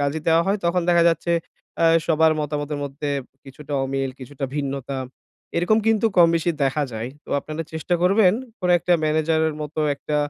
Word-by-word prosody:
কাজই 145 +2 -1
দেওয়া 165 +1 +4
হয় 200 +2 +1
তখন 170 +1 +1
দেখা 170 -1 +4
যাচ্ছে 165 +1 -1 0.5
আ 165 - +5 0.2
সবার 160 -1 +4
মতামতের 150 0 -3
মধ্যে 145 +1 -4 0.3
কিছুটা 140 +2 -10
অমিল, 135 0 -2
কিছুটা 135 +2 -6
ভিন্নতা 140 -1 -3 0.6
এরকম 180 +6 +3
কিন্তু 225 0 +3
কমবেশি 170 0 +4
দেখা 135 +3 0
যায়। 110 +2 -4 0.2
তো - - -13
আপনারা 155 +2 -5
চেষ্টা 160 +3 -1
করবেন 185 +1 +5 0.3
কোন 180 - -1
একটা 175 +2 0
ম্যানেজার 160 +1 +1
এর 155 - -5
মতো 155 +1 -4
একটা 150 +1 -3
155 Hz, 170 wpm, -22 LUFS, 140-170 Hz, 0.6 s, আ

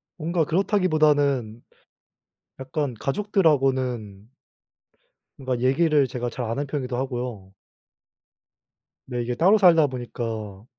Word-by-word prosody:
뭔가 165 -1 -1
그렇다기 190 +3 +1
보다는 145 -8 +1 1.0
약간 135 -1 -3
가족들하고는 130 - 0 1.1
뭔가 130 -2 -3
얘기를 145 +1 +3
제가 120 0 -4
잘 125 - -4
안하는 135 +6 -2
편이기도 130 -4 -3
하고요. 120 -7 -5 1.6
네 120 -1 -2
이게 120 +1 -3
따로 190 - +4
살다 165 -6 +5
보니까 115 -5 -6
130 Hz, 250 characters per minute, -24 LUFS, 120-155 Hz, 1.6 s, 살다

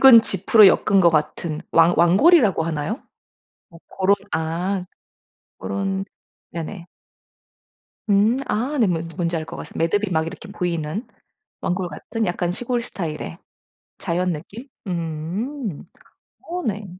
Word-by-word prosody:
굵은 250 -4 +9
짚으로 200 +2 +5
엮은 195 +1 +4
것 170 -2 +6
같은 155 0 -1
왕 165 +1 +5
왕골이라고 200 - +5
하나요? 165 - -3 0.7
어 165 - -14
고런 195 +1 +2 0.2
아 175 +4 -1 0.7
고런 195 0 -2 0.5
네네. 170 +2 -6 1.3
음 210 +6 +4
아 260 +7 -1
네. 230 - +4
뭔 170 -3 -1
뭔지 170 -1 -1
알 160 - -3
것 165 +1 -8
같습 - - -9
매듭이 200 +5 +1
막 160 0 +1
이렇게 200 +5 -8
보이는 175 +1 -3 0.5
왕골 180 0 -1
같은 220 +8 -4
약간 175 0 -1
시골 245 +4 -1
스타일의 155 - -5 0.6
자연 180 +1 0
느낌? 200 - -8 0.2
음 175 - -4 0.6
어 355 +1 -3
네. 210 -3 -3
185 Hz, 235 characters per minute, -22 LUFS, 165-215 Hz, 1.3 s, 굵은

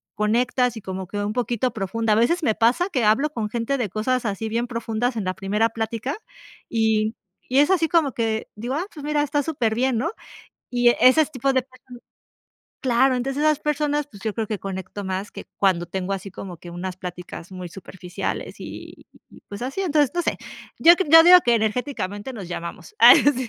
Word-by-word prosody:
conectas 240 +3 +1
y - - -7
como 190 -1 -6
que 205 - -6
un 205 +1 -2
poquito 245 0 -1
profunda. 220 +2 -1
A - - +3
veces 240 +11 +2
me 220 -7 +2
pasa 250 +12 +2
que 265 -10 -1
hablo 235 +8 +3
con 225 -7 -3
gente 235 +5 -1
de 235 -6 -2
cosas 235 +6 -1
así 210 +1 -2
bien 230 +2 -1
profundas 235 0 -2
en 210 - -2
la 185 - -1
primera 210 +4 0
plática 225 +5 -3 0.5
y 220 -1 +1 0.3
y 260 +2 +2
es 290 - +4
así 335 -4 +3
como 310 -6 +2
que 220 -1 -2
digo: 235 +5 -4
"Ah, 330 +5 -2
pues, 295 - -10
mira, 295 0 0
está 290 0 0
superbién", 250 -4 0
¿no? 330 +9 -1 0.6
Y 245 -1 +3
e - - 0
ese 255 +5 +6
s 305 - -4
tipo 270 +1 0
de 260 -1 +2
personas 255 -1 -15 0.8
claro, 260 0 +3
entonces 270 +3 -2
esas 305 -1 +3
personas, 295 -1 0
pues 200 - -14
yo 220 -2 -2
creo 225 -2 -2
que 210 -1 -3
conecto 190 +1 -6
más 190 +2 -4
que - - -9
cuando 185 -3 +2
tengo 190 +2 -3
así 195 0 -7
como 185 -1 -8
que 175 - -11
unas 180 +1 -5
pláticas 180 -1 -8
muy 185 -1 -7
superficiales 180 0 -6
y - - -10 0.2
y - - -16
pues 200 - -8
así, 270 +9 -3
entonces, 300 -6 +2
no 350 - 0
sé. - - -2 0.4
Yo 340 +1 +8
cre 380 - -1
yo 325 +1 +10
digo 360 +1 +10
que 240 - +4
energéticamente 220 -1 -3
nos 205 -7 -7
llamamos. 175 - -7
Ay - - +10 0.2
sí. 255 -2 -3
230 Hz, 205 wpm, -23 LUFS, 205-270 Hz, 0.8 s, yo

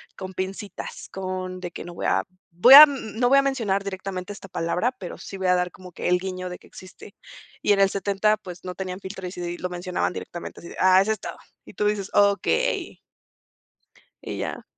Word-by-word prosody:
con 190 0 -7
pincitas, 195 +2 -6
con 185 -1 -5
de 175 -1 -6
que, - - -8
no 175 0 -9
voy - - -5
a - - +2 0.3
voy 210 +11 +8
a 295 - +14
n 250 -7 0
no 245 - +4
voy 275 - +6
a - - +5
mencionar 225 -8 0
directamente 190 -1 -5
esta 195 -1 -10
palabra, 180 +9 -1
pero 180 - -8
sí 195 - -9
voy 190 -1 -2
a 180 - +5
dar 180 0 0
como 185 -1 -13
que, - - -4
el 180 0 +4
guiño 185 -1 -5
de 180 - -8
que - - -19
existe. 185 - -13 0.5
Y 205 - +4
en 195 - +1
el 195 - +5
70 200 +2 +1
pues, 180 -4 -10
no 180 0 -5
tenían 185 0 -5
filtro, 190 -1 -7
y 180 - -7
sí 175 -1 -5
lo 180 - -4
mencionaban 180 0 -2
directamente, 175 - -8
así 170 - -10
de: - - -11
"Ah, 185 0 +6
ese 215 +3 0
estaba", 215 - -5 0.3
y - - -13
tú 210 - -1
dices: 205 -2 -1
"Okey". 205 - +1 1.2
Y - - -6
ya. - - -4
190 Hz, 220 wpm, -24 LUFS, 180-205 Hz, 1.2 s, a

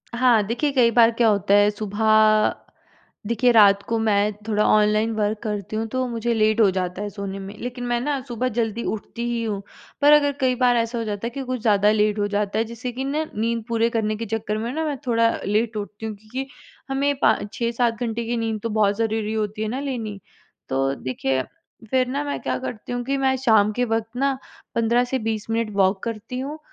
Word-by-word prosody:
हाँ, 235 -3 +4
देखिए 245 +6 0
कई 245 -4 +4
बार 230 0 +5
क्या 230 0 +2
होता 200 -1 +1
है 205 0 +6
सुबह 215 +1 +3 0.7
देखिए, 240 +2 +2
रात 200 -3 +6
को 230 -1 +1
मैं 210 -1 +2 0.2
थोड़ा 210 -1 +2
ऑनलाइन 215 +1 +3
वर्क 210 0 0
करती 210 -1 -4
हूँ 225 - -1
तो 255 +2 -1
मुझे 235 0 -1
लेट 220 +1 +2
हो 205 -3 +6
जाता 185 +1 -3
है 210 - -3
सोने 200 -1 -6
में 195 +1 -8
लेकिन 245 +1 -5
मैं 240 0 0
ना 280 +1 -1
सुबह 245 +2 -1
जल्दी 230 0 -1
उठती 220 +2 -6
ही 235 -1 -1
हूँ। 210 -3 -2 0.4
पर 290 +1 +7
अगर 285 -1 +5
कई 255 -1 +2
बार 245 -1 +4
ऐसा 230 +1 -1
हो 230 - -2
जाता 210 +1 -4
है - - -2
कि 270 +3 -5
कुछ 255 -1 -3
ज़्यादा 210 -1 +4
लेट 210 0 +2
हो 205 - +1
जाता 205 0 -1
है, 225 - +2
जिससे 235 +2 -6
कि 260 +2 -4
ना 300 +3 -1
नींद 230 +1 -1
पूरी 230 0 +1
करने 215 -2 -1
के 230 +1 -5
चक्कर 215 0 -2
में 230 +3 -3
ना 320 +3 -2
मैं 295 -2 -2
थोड़ा 230 -1 +3 0.2
लेट 215 +2 0
उठती 210 +1 -6
हूँ, 215 - -4
क्योंकि 230 +6 -6 0.4
हमें 280 +1 +1
पा - - +5 0.2
6-7 235 0 -1
घंटे 235 -1 -2
की 235 +1 -2
नींद 225 -2 -2
तो 230 - -2
बहुत 210 -2 +2
ज़रूरी 220 -1 -1
होती 215 0 -2
है 220 - -1
ना 255 +5 -3
लेनी। 230 -8 -4 0.5
तो 135 +1 0
देखिए, 130 0 -2 0.5
फिर 255 -1 +2
ना 280 +3 -2
मैं 285 - -3
क्या - - -1
करती 245 -2 -6
हूँ 245 0 -2
कि 275 +2 -1
मैं 265 -1 +2
शाम 220 -5 +3
के 245 +3 0
वक़्त 225 -1 -1
ना 270 0 +1 0.4
15 235 +2 +2
से 260 +1 -2
20 220 -2 -3
मिनट 225 -1 0
वॉक 190 0 +2
करती 230 +2 -5
हूँ 290 +3 -5
225 Hz, 220 wpm, -23 LUFS, 210-245 Hz, 0.7 s, पर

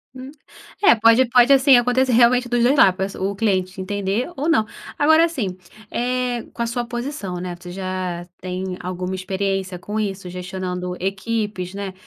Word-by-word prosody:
Hum. 260 +1 -9 0.5
É, 390 - +6
pode 230 +3 +5
pode, 245 +2 +6
assim, 270 -1 +6
acontecer, 250 +1 +2
realmente, 245 +1 +4
dos 240 -1 +1
2 255 +4 +4
la 195 - +6
p 185 +1 -3
o 195 +1 -2
cliente 190 -2 -1
entender 200 +4 -2
ou, 295 +5 -1
não. 220 -9 +3 0.3
Agora, 315 +3 +5
assim, 245 - -3 0.4
eh, 245 0 -1
com 235 - -3
a - - -2
sua 240 +1 -2
posição, 240 -6 -5
né. 180 0 -5
Você, 175 0 -9
já, 185 -2 -4 0.2
tem 185 0 -4
alguma 180 +1 -4
experiência 190 0 -2
com 210 +4 -4
isso, 195 -3 -3
gestionando 180 0 -5
equipes, 195 -1 -3
né. 200 -1 -5
200 Hz, 170 wpm, -21 LUFS, 185-245 Hz, 0.5 s, É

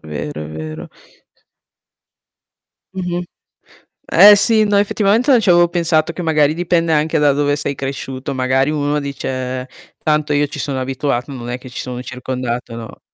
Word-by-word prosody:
è - - -16
vero, 75 0 -5
è - - -8
vero. 80 0 -7 2.0
Mh-mh. 180 -1 -3 0.9
Eh 205 +4 +9
sì, 220 +1 +3
no 205 -1 +1
effettivamente 210 +5 +2
non 250 -3 +6
ci 210 - -1
avevo 175 0 +5
pensato, 165 -2 +1
che 175 - -6
magari 155 -2 +2
dipende 170 -1 +1
anche 155 +1 +1
da 145 -1 +4
dove 145 +1 +1
sei 145 -1 -3
cresciuto. 135 0 -5
Magari 130 +2 +1
uno 145 -1 0
dice: 130 -2 -4 0.3
"Tanto 150 -1 +1
io 145 0 +2
ci - - -8
sono 135 -2 -3
abituato, 130 0 -2
non 120 -2 -6
è 125 - -3
che 130 0 -12
ci 125 - -6
sono 125 -1 -6
circondato, 125 -1 -5
no?" 115 -1 -9
145 Hz, 165 wpm, -18 LUFS, 130-165 Hz, 2.0 s, Eh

